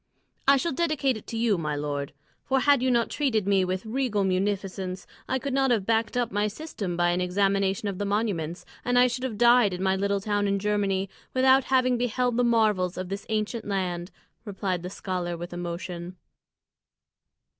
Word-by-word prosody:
"I 275 0 +7
shall 335 +5 -1
dedicate 295 -4 +1
it 215 - -10
to 225 - -4
you, 225 -5 +2
my 150 -2 -2
lord, 145 -1 -3 0.3
for 265 0 +1
had 285 -1 +4
you 260 - +2
not 235 -2 +2
treated 225 -9 0
me 195 -2 +3
with 185 +2 -2
regal 220 -3 0
munificence, 190 -1 -2 0.2
I 260 - +1
could 275 +1 -4
not 270 0 +2
have 220 -6 +1
backed 225 +2 +1
up 245 -1 0
my 205 +1 +1
system 210 - -5
by 175 0 +3
an 175 +1 0
examination 195 +2 +1
of 195 -2 -4
the 205 - -1
monuments, 200 -6 -2 0.2
and 245 0 +1
I 250 - +7
should 250 +1 -2
have 240 -5 -3
died 240 -4 +5
in 180 - -4
my 190 0 +2
little 200 +1 0
town 205 0 0
in 200 0 +1
Germany 200 -1 0 0.3
without 260 +1 +5
having 255 -2 +2
beheld 245 0 0
the 245 - +3
marvels 215 -6 +2
of 185 0 -4
this 195 +1 -5
ancient 220 +1 -2
land," 180 -3 -2 0.3
replied 195 -4 -3
the 180 - -5
scholar, 180 -3 -3
with 175 +1 -7
emotion. 175 0 -5
205 Hz, 190 wpm, -26 LUFS, 185-245 Hz, 0.3 s, I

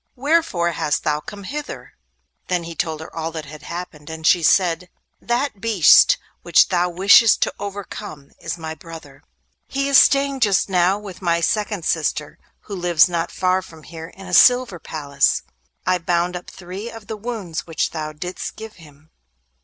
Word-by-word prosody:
—wherefore 275 - +1
hast 150 - -1
thou 150 -1 0
come 200 +6 -10
hither?' 295 +8 -7 0.5
Then 180 -2 -1
he 165 0 -7
told 160 -2 -3
her 160 - -11
all 165 0 -3
that 160 -2 -6
had 150 0 -11
happened, 160 -2 -8
and 160 0 -7
she 175 - +5
said: 180 +1 +2 0.3
'That 240 -3 -2
beast 225 - +6 0.2
which - - +4
thou 180 -1 +1
wishest 200 +5 +5
to - - -2
overcome 200 -7 -7
is - - -5
my 160 -1 -6
brother. 160 -4 -12 0.5
He 275 +1 -2
is 280 -1 +7
staying 275 0 +3
just 205 -5 +2
now 185 +1 +2
with 200 -3 -10
my 170 -2 +1
second 205 0 -1
sister, 150 -2 -1 0.2
who 205 - -8
lives 175 -3 +4
not 170 -2 -2
far 185 0 0
from 160 -4 -15
here 160 0 -9
in 195 +3 -13
a 180 - -8
silver 245 -1 +5
palace. 140 -4 0 0.4
I 185 0 +2
bound 175 +1 0
up 180 - -7
three 190 +5 -8
of 225 -2 -11
the 220 +1 -5
wounds 210 -8 -5
which 165 - -1
thou 155 -1 -4
didst 180 +4 -6
give 220 -2 -10
him. 155 -2 -18
180 Hz, 175 wpm, -21 LUFS, 160-205 Hz, 0.5 s, is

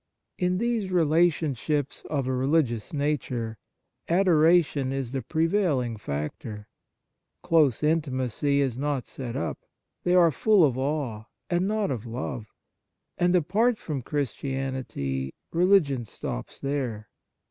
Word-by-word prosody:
In 180 -1 +1
these 230 -2 0
relationships 155 -4 +1
of 140 -4 -1
a 130 - -1
religious 130 -4 +1
nature, 130 -7 -2 0.5
adoration 165 -5 +4
is 135 -3 -3
the 135 -1 -2
prevailing 160 - +1
factor; 105 +5 -5 0.8
close 155 -6 +3
intimacy 140 -3 +1
is 130 -3 -1
not 145 -3 -1
set 125 -3 -6
up: 85 - -3 0.4
they 180 0 +3
are 170 -2 +6
full 210 +4 +4
of 135 -5 +3
awe, 130 -5 -2 0.3
and 175 +2 +2
not 210 -4 0
of 120 -2 -4
love. 115 -1 -5 0.7
And, 175 +1 +3
apart 210 +8 +2
from 150 -9 -4
Christianity, 130 - -3 0.2
religion 165 -8 +3
stops - - -6
there. 130 -7 -3
140 Hz, 115 wpm, -26 LUFS, 125-170 Hz, 0.8 s, are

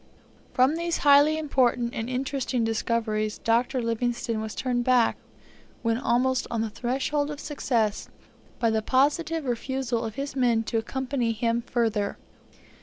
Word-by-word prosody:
From 260 +5 +4
these 340 0 -1
highly 290 +2 +6
important 250 -5 +1
and 225 +2 -4
interesting 260 -1 -1
discoveries, 225 -1 -1
Dr. 240 +2 +1
Livingstone 230 -1 -1
was 220 0 -5
turned 245 -2 -1
back, 250 -2 +3 0.7
when 230 0 +1
almost 255 +1 +1
on 230 -1 -1
the 220 -1 -2
threshold 270 +6 -1
of 295 -1 -6
success, 235 -9 -1 0.5
by 230 -1 +1
the 220 0 +1
positive 300 +6 +1
refusal 245 -1 -2
of 220 -2 -5
his 275 0 -4
men 240 -4 +2
to 225 0 -1
accompany 250 0 -2
him 230 +1 0
further. 225 -4 -1
245 Hz, 140 wpm, -26 LUFS, 230-270 Hz, 0.7 s, highly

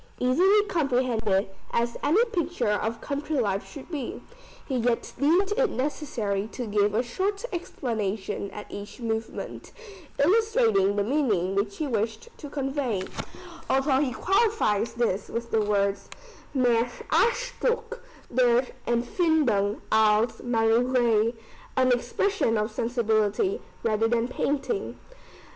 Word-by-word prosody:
Easily 370 +12 +4
comprehended, 245 - +1 0.2
as 235 0 0
any 360 +12 +4
picture 350 - -1
of 220 +2 -1
country 290 +1 -3
life 200 -4 0
should 285 +4 -10
be, 285 -6 -4 0.5
he 265 - -1
yet 235 0 0
deemed 350 +8 +3
it - - +2
necessary 230 -8 -2
to 250 - -4
give 205 -1 +1
a 235 - +2
short 395 - -2
explanation 215 - -3
at 210 - -8
each 205 +3 -8
movement, 225 -1 -4 0.5
illustrating 280 - +3
the 205 - +1
meaning 210 - +1
which 200 +1 -1
he 310 - -1
wished 225 - -2
to 290 - -8
convey, 270 -8 -2 0.7
although 270 0 +3
he 275 -3 +1
qualifies 385 - +1
this 225 -5 -1
with 235 0 -4
the 220 - +3
words, 200 -1 0 0.5
"mehr 245 -2 +3 0.2
Ausdruck 485 -1 +1 0.3
der 245 0 +4 0.2
Empfindung 240 - +1
als 220 +1 +3
Malerei." 235 -1 +2 0.4
[An 255 -1 +4
expression 245 - +1
of 215 +2 -1
sensibility 230 - 0 0.2
rather 225 0 +2
than 235 0 +1
painting. 290 - -2
240 Hz, 120 wpm, -26 LUFS, 215-300 Hz, 0.7 s, Easily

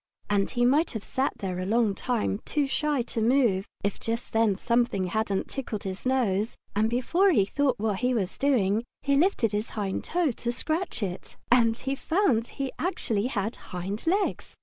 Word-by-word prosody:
And 200 -1 +2
he 245 -1 +1
might 295 +6 +3
have 220 -3 -4
sat 265 +2 -1
there 185 -2 -3
a 185 - -2
long 220 -1 +2
time, 220 -2 -1
too 295 -2 0
shy 290 -1 0
to 230 - -3
move, 225 -5 +3 0.2
if 200 0 -1
just 230 +1 -3
then 220 -3 +3
something 235 -3 +1
hadn't 200 +1 -1
tickled 235 -6 -5
his 190 +5 -4
nose, 225 -5 +1 0.2
and 215 +2 +2
before 330 +11 +2
he 205 - +4
thought 280 +4 +1
what 210 -2 0
he 250 0 +1
was 190 -5 -2
doing 230 -6 +2 0.2
he 280 0 +2
lifted 280 - +2
his 210 +2 -2
hind 195 -2 -2
toe 345 -4 +1
to 240 +1 -3
scratch 315 - -2
it. 185 -2 -5
And 230 -2 +5
he 270 +2 -2
found 275 - +1
that - - -17
he 275 -2 -2
actually 240 - 0
had 220 -3 -2
hind 195 - -6
legs! 390 +4 0
235 Hz, 190 wpm, -27 LUFS, 205-270 Hz, 0.2 s, And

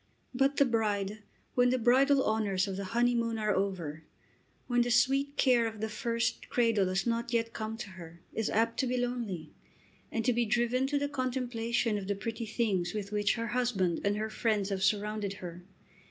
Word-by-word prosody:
But 270 +2 +2
the 280 - +6
bride, 210 -3 -1 0.3
when 245 0 +4
the 255 - +2
bridal 265 +3 +4
honours 205 -3 +1
of 195 - -3
the 195 0 -4
honeymoon 235 -1 +2
are 215 -1 +1
over, 175 -6 -2 0.6
when 245 -1 +2
the 240 - +1
sweet 270 +4 +2
care 245 -3 +4
of 220 -1 -7
the 220 +1 -2
first 230 +1 -2
cradle 230 -5 +2
has 185 +1 0
not 235 0 -1
yet 230 -1 0
come 220 0 -4
to 215 - -6
her, 170 -2 -11
is 225 - -1
apt 230 +1 +1
to 260 - +2
be 250 +1 0
lonely 235 -10 -3 0.6
and 225 - -2
to 250 - +3
be 235 0 +1
driven 240 +3 +1
to 290 +1 0
the 285 0 0
contemplation 245 -4 -1
of 190 - -7
the 200 - 0
pretty 225 +3 -4
things 215 -4 0
with 200 -1 -4
which 210 0 +1
her 230 -1 -3
husband 210 -8 0
and 205 +1 +1
her 220 +1 -3
friends 215 -3 0
have 195 -1 -2
surrounded 205 +1 0
her. 175 -2 -9
225 Hz, 195 wpm, -31 LUFS, 200-245 Hz, 0.6 s, the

